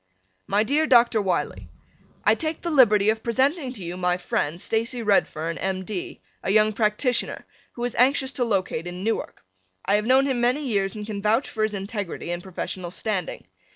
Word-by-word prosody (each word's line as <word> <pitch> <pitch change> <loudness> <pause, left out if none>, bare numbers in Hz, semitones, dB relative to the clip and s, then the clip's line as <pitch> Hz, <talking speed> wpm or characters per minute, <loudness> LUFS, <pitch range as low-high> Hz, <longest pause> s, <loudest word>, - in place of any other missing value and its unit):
My 205 +2 +2
dear 295 +7 +1
Dr. 235 -4 +5
Wiley: 145 - -2 0.5
I 215 - +5
take 315 +7 -3
the 340 - -3
liberty 215 -7 +5
of 220 0 -4
presenting 265 +5 0
to 205 -7 -9
you 175 +1 -5
my 180 -1 +1
friend, 170 -2 -2
Stacy 230 +4 -1
Redfern, 165 -5 +1
M. 190 0 -2
D., 195 -3 -6 0.2
a - - -3
young 215 +1 +4
practitioner, 220 +4 0 0.3
who 240 - -6
is 245 -1 -1
anxious 265 +2 +3
to 260 - -1
locate 190 -6 -1
in 180 +1 -6
Newark. 225 - -3 0.4
I 205 - +3
have 210 +1 -2
known 265 +2 +5
him 260 -3 0
many 255 +5 +1
years 200 -3 0
and 210 -1 -6
can 205 -2 -5
vouch 220 +6 +2
for 220 - -5
his 215 -1 +1
integrity 195 -3 -4
and 175 0 -3
professional 185 -1 -5
standing. 190 0 -3
215 Hz, 190 wpm, -24 LUFS, 190-245 Hz, 0.5 s, Dr